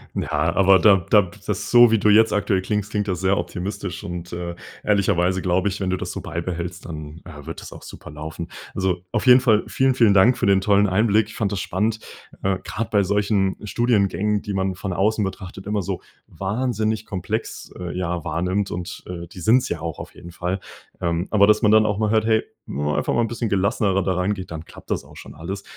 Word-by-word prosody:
Ja, 80 +2 0
aber 95 0 +6
da 95 +2 +6
da 105 -3 +6 0.2
das, - - -3
so 120 -1 +8
wie 115 - +3
du 105 +1 +2
jetzt 110 +1 +5
aktuell 100 -2 +1
klingst, 105 +2 -2
klingt 105 0 -1
das 90 -2 -2
sehr 95 +1 +3
optimistisch 95 +2 -4
und, 90 0 -6
äh, 85 0 -4 0.3
ehrlicherweise 95 -3 +2
glaube 95 +2 +1
ich, 95 - -5
wenn 95 - -1
du 95 - 0
das - - -5
so - - -5
beibehältst, 85 +1 -5
dann, 75 0 -8
äh, 75 -5 -11
wird - - -6
das - - -10
auch - - -12
super - - -11
laufen. 80 +3 -7 0.3
Also 95 -2 0
auf - - -1
jeden 125 0 +8
Fall 110 -5 +3
vielen, 130 -1 +1
vielen 115 -5 +5
Dank 115 +6 +5
für - - 0
den 100 -1 +4
tollen 100 +1 +4
Einblick. 105 +2 +2
Ich - - -11
fand 105 -2 -1
das 100 -3 -2
spannend, 110 +4 -1 0.4
äh, 95 -1 +1
gerade 115 -2 -4
bei 105 - +4
solchen 100 0 +1
Studiengängen, 105 -2 +1
die 105 - -4
man 95 -1 -1
von 95 0 -4
außen 105 +3 +1
betrachtet, 95 0 -6
immer 105 0 -1
so - - -3 0.3
wahnsinnig 110 +1 -2
komplex, 105 +3 -4
äh, 90 0 -5
ja, 90 -1 -2
wahrnimmt 90 +4 -1
und, 90 +1 -6
äh, 85 -1 -6
die 90 - -12
sind's 115 +9 +3
ja 85 - -2
auch 80 -3 -4
auf - - -9
jeden 85 - -11
Fall. 90 +2 -3 0.4
Ähm, 85 +1 -1
aber 100 -1 +5
dass 105 +2 +3
man 105 - +5
dann 110 0 +5
auch 105 -1 0
mal 110 -1 0
hört, 110 -1 +2
hey, 110 -1 +3 0.2
wenn 75 +2 -3
man 75 - 0
einfach - - 0
mal 120 - +3
'n 115 - +1
bisschen 115 -1 -3
gelassenerer 100 0 +1
da 95 - 0
rangeht, 95 0 -2
dann 80 -1 -6
klappt - - -13
das - - -1
auch - - -16
schon - - -11
alles. 95 +5 -6
95 Hz, 225 wpm, -22 LUFS, 90-105 Hz, 0.4 s, so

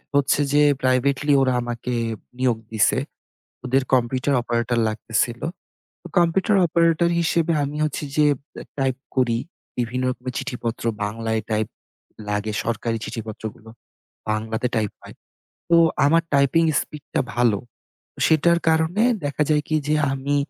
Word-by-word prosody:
হচ্ছে 140 +1 +3
যে 145 0 +5 0.2
প্রাইভেটলি 135 +3 +2
ওরা 130 -1 +2
আমাকে 120 +1 -4 0.5
নিয়োগ 125 -3 +2 0.2
দিছে। 110 - +3 0.7
ওদের 130 +2 +2
কম্পিউটার 130 +3 +1
অপারেটর 120 0 0
লাগতেছিল। 115 +2 -1 0.6
তো - - -12
কম্পিউটার 190 +4 +3
অপারেটর 170 0 +3
হিসেবে 170 0 +1
আমি 145 +1 -4
হচ্ছে 150 0 -2
যে 150 -1 +5 0.3
বে - - -9 0.2
টাইপ 135 -2 +1 0.2
করি 120 -3 +2 0.4
বিভিন্ন 125 +1 -1 0.2
বি 130 - -2
চিঠিপত্র 125 -5 -4 0.2
বাংলায় 110 +1 -2
টাইপ 110 -1 0 0.6
লাগে 105 +1 -1
সরকারি 115 0 -1
চিঠিপত্রগুলো 110 0 -7 0.6
বাংলাতে 110 +2 -1
টাইপ 105 -3 0
হয়। - - -12 0.6
তো 170 - +6 0.3
আমার 165 +3 +4
টাইপিং 140 +4 +4 0.2
স্পিডটা 150 -2 -4
ভালো। 120 -4 +3 0.7
সেটার 170 +2 +4
কারণে 160 +6 +2 0.2
দেখা 145 +1 -2
যায় 150 -1 +3
কি? 155 - 0
যে 155 - +3 0.2
আমি 135 +2 -1
130 Hz, 130 wpm, -22 LUFS, 115-150 Hz, 0.7 s, তো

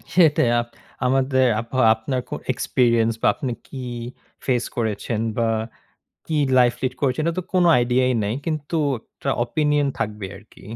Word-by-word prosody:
সেটাই 160 -8 +5
আ - - +2 0.4
আমাদের 130 0 +2 0.3
বা 130 - -1 0.2
আপনার 125 +3 -3
কো - - -6 0.2
এক্সপেরিয়েন্স 115 -2 +2
বা - - +3
আপনি 135 -5 -3 0.2
কি - - -9 0.7
ফেস 125 -3 +1
করেছেন 110 0 -1 0.2
বা 115 - +2 0.8
কি 160 - -3 0.2
লাইফ 120 -1 +4
লিড 130 -1 -1
করেছেন 140 +2 +1
এটা 170 - 0
তো - - 0
কোনো 180 -1 +4
আইডিয়াই 125 +1 +2
নাই 105 +2 -1
কিন্তু 155 -1 -3 0.3
একটা 135 - -6
ওপিনিয়ন 150 +1 +1
থাকবে 105 -2 -3
আরকি। - - -17
130 Hz, 150 wpm, -22 LUFS, 120-145 Hz, 0.8 s, সেটাই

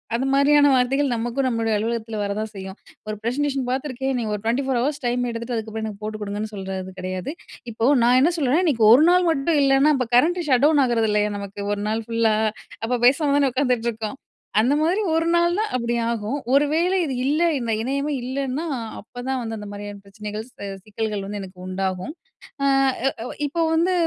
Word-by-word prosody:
அந்த 260 - -1
மாரியான 285 +1 +5
வார்த்தைகள் 265 +1 +2
நமக்கும் 240 +4 -1
நம்மளுடைய 230 -2 0
அலுவலகத்தில 225 0 -3
வர 200 - -2
தான் 220 0 -4
செய்யும். 190 0 -8 0.3
ஒரு 215 - -3
ப்ரசன்டேஷன் 270 +1 -1
பார்த்துருக்கேன். 265 0 -2
நீங்க 220 -3 -2
ஒரு 205 - -7
24:00 255 +1 0
ஹவர்ஸ் 280 +2 -2
டைம் 245 +1 0
எடுத்துட்டு, 235 +1 -4
அதுக்கப்பறம் 220 0 -4
எனக்கு 210 -1 -7
போட்டு 215 0 -4
குடுங்கன்னு 210 +1 -4
சொல்றது 190 -1 -5
கிடையாது. 185 +7 -4 0.4
இப்போ 225 +1 -1 0.2
நான் 245 +2 +5
என்ன 330 +6 +4
சொல்றேன், 285 +4 +2
இன்னக்கி 260 -11 +2
ஒரு 295 +5 +6
நாள் 360 0 +4
மட்டும் 300 0 +1
இல்லன்னா, 275 +2 +4
அப்ப 250 -3 -1
கரண்ட்டு 340 +5 +3
ஷட் 255 0 +3
டவுன் 300 -2 +4
ஆகிறதில்லையா! 215 -3 +1
நமக்கு 200 0 -7
ஒரு 205 - -3
நாள் 220 +1 -1
ஃபுல்லா? 230 -2 +2 0.5
அப்ப 245 +2 0
பேசாம 280 +3 +4
தான 280 -2 +3
உட்காந்துட்டுருக்கோம். 235 -3 -1 0.4
அந்தமாரி 310 - +2
ஒரு 325 +1 +1
நாள் 345 0 +3
தான் 435 - 0
அப்பிடி 235 -1 -1 0.2
ஆகும். 230 +5 -2
ஒரு 285 +2 +5
வேளை 345 +4 +2
இது 285 -5 -2
இல்லை, 305 +5 +2
இந்த 235 -2 -2
இணையமே 280 +4 -1
இல்லன்னா, 270 +4 -3 0.4
அப்பதான் 250 +4 -4
வந்து 225 -1 -4
அந்த 210 -1 -8
மாரியான 205 0 -8
பிரச்சனைகள்ஸ், 210 +3 -7 0.3
சிக்கல்கள் 215 -1 -3
வந்து 205 +1 -5
எனக்கு 185 -1 -11
உண்டாகும். 185 +6 -3 0.5
அ, - - +2 0.6
அ - - -6 0.2
இப்ப 330 +4 -1
வந்து 345 +3 +2
245 Hz, 180 wpm, -23 LUFS, 215-280 Hz, 0.6 s, ஒரு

